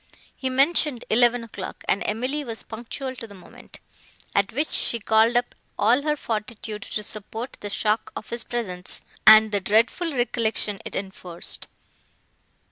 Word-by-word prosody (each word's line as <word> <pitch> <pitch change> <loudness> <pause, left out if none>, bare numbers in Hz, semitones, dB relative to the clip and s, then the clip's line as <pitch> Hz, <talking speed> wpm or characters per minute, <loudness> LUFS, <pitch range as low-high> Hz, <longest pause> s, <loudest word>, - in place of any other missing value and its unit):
He 260 - -2
mentioned 275 -1 +2
eleven 240 +1 +4
o'clock, 205 -4 -7
and 200 - +2
Emily 255 +7 -1
was 230 -4 -5
punctual 245 +4 -6
to 230 - -7
the 200 - -12
moment; 180 -2 -11 0.5
at 200 -1 +2
which 295 +6 -1
she 235 - +1
called 220 +3 +4
up 245 - 0 0.2
all 240 +6 +4
her 300 +1 +1
fortitude 215 -3 -4
to 210 - -4
support 220 +4 -5
the 205 - -5
shock 215 +2 0
of - - -7
his 235 -1 +2
presence 185 -7 -4 0.3
and 215 0 +9
the 205 - +2
dreadful 230 - +2
recollections 225 -5 0
it - - -6
enforced. 185 -3 -4
225 Hz, 150 wpm, -24 LUFS, 210-245 Hz, 0.5 s, and